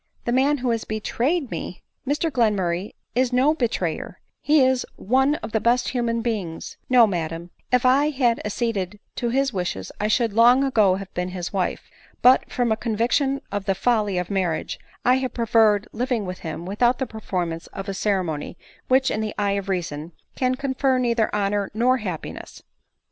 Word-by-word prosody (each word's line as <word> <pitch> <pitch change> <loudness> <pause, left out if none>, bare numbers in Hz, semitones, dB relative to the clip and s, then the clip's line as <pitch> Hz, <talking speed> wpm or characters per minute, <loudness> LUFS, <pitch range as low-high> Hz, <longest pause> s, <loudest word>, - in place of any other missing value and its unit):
" - - -40
The 240 - 0
man 275 +4 +3
who 250 -2 -1
has 230 -1 -1
betrayed 250 +7 -1
me! - - -6 0.2
Mr 300 +3 0
Glenraurray 200 -6 0 0.2
is 255 +1 +1
no 260 +5 +3
betrayer 220 - -2
— - - -57
he 295 -3 +4
is 260 -1 +2
one 265 +7 +2
of - - -8
the 220 - +1
best 240 +3 +2
of - - -2
human 235 -2 -1
beings* 200 -9 -4
No, 250 -2 +7
madam; 170 -3 -4 0.2
if 250 0 +3
I 275 +4 +4
had 255 -5 +1
acceded 210 -3 -2 0.2
to 240 - -1
his 270 +1 +1
wishes, 180 -1 -3
I 210 - 0
should 225 -1 +1
long 240 +4 +6
ago 215 -8 +3
have 195 0 -8
been 180 +1 -2
his 180 0 -5
wife; 190 -2 -2 0.4
but, 255 +1 +5
from 245 -2 0
a 220 - +2
conviction 245 +5 0
of 200 -1 -3
the 195 - +1
folly 210 -3 +1
of 180 +2 -2
marriage, 185 -5 -1 0.3
I 250 +1 +5
have 260 -1 -3
preferred 220 -3 +3
living 240 -2 -1
with 185 0 -6
him 165 +1 -6
without 240 +6 +2
the 265 - -1
performance 180 -7 -4
of 195 +1 -8
a 195 - -2
ceremony 185 -6 -2 0.3
which, 260 0 +3
in 215 - -1
the 215 -1 -3
eye 205 -1 +1
of 200 0 -2
reason, 165 -3 -3 0.2
can 255 0 +1
confer 265 0 0
neither 235 -3 +1
honor 200 -1 0
nor 250 +3 +3
happiness." 185 -9 -7
225 Hz, 185 wpm, -23 LUFS, 195-255 Hz, 0.4 s, No